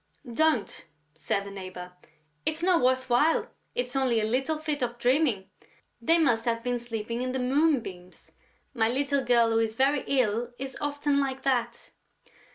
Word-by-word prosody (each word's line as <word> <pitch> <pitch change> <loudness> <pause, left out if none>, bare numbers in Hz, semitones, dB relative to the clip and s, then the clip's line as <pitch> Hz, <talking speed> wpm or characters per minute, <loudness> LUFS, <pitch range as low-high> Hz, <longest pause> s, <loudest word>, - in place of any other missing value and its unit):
"Don't," 310 -5 +1 0.3
said 180 +5 -2
the 200 - -8
neighbor; 185 -2 -8 0.5
"it's 315 - -2
not 360 -2 +3
worth 260 +1 +2
while. 260 +7 +3 0.3
It's 245 +1 -3
only 255 -4 +2
a 215 - 0
little 265 +7 0
fit 305 -2 -3
of 240 -1 -2
dreaming; 245 -6 +1 0.5
they 330 +8 +4
must 235 -9 +2
have 230 -1 -1
been 245 0 -1
sleeping 230 0 -4
in 255 0 -2
the - - -1
moonbeams.... 250 - -1 0.4
My 225 -3 +2
little 275 +2 0
girl, 235 -2 +3
who 225 - +3
is 220 -1 -1
very 270 +3 +2
ill, 240 -2 0
is 270 0 -6
often 290 0 0
like 270 -1 -2
that...." 240 -3 -1
250 Hz, 165 wpm, -27 LUFS, 230-280 Hz, 0.5 s, they